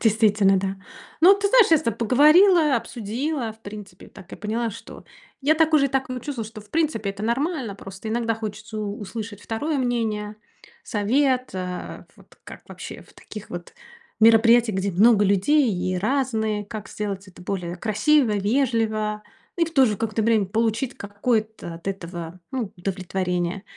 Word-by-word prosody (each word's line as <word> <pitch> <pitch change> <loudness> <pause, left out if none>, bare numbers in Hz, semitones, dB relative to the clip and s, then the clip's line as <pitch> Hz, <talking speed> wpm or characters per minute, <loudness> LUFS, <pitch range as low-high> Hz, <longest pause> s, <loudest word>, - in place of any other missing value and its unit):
действительно, 210 -3 +3
да. 195 +1 -3 0.5
Ну, 375 +4 +9
ты 400 0 0
знаешь, 480 -1 +6
я 320 - +6
с - - -7
тобой 230 - -1
поговорила, 305 - +5
обсудила, 240 +4 -3
в 220 - -28
принципе, 205 -3 -10
так 190 - -15
и - - -6
поняла, 225 +2 -2
что - - -11 0.4
я 290 +3 +3
так 320 0 +2
уже 285 -3 +5
и - - -4
так 265 -1 -1
м 250 - -4
чувствую, 255 -4 -5
что, 215 0 -10
в 210 - -18
принципе, 305 -11 0
это 200 +1 -8
нормально. 255 - -1
Просто 195 +2 -9
иногда 230 0 0
хочется 215 0 -6
у 210 0 -4
услышать 210 0 -7
2 285 +9 -2
мнение, 220 -4 -2 0.5
совет, 255 +4 +1
э, 180 -1 -5
вот - - -21
как - - -11
вообще - - -9
в - - -22
таких 210 -1 -10
вот 175 -1 -8 0.5
мероприятиях, 230 -1 +5
где 195 +1 -1
много 205 +3 +5
людей 225 +7 +3
и 185 +1 -2
разные, 220 -1 -1
как 215 -1 -7
сделать 200 -2 -5
это 190 - -15
более 180 -1 -4
красиво, 225 - +2
вежливо, 215 -1 0 0.3
и 340 - +3
в 330 - -8
то 270 -4 +5
же 210 - -1
какое-то 220 0 -2
время 220 -2 +3
получить 225 +5 -1
какое-то 215 -3 -2
от 170 +3 -7
этого, 175 -2 -6
ну, 250 -7 -3
удовлетворение. 185 0 -2
220 Hz, 170 wpm, -23 LUFS, 200-255 Hz, 0.5 s, Ну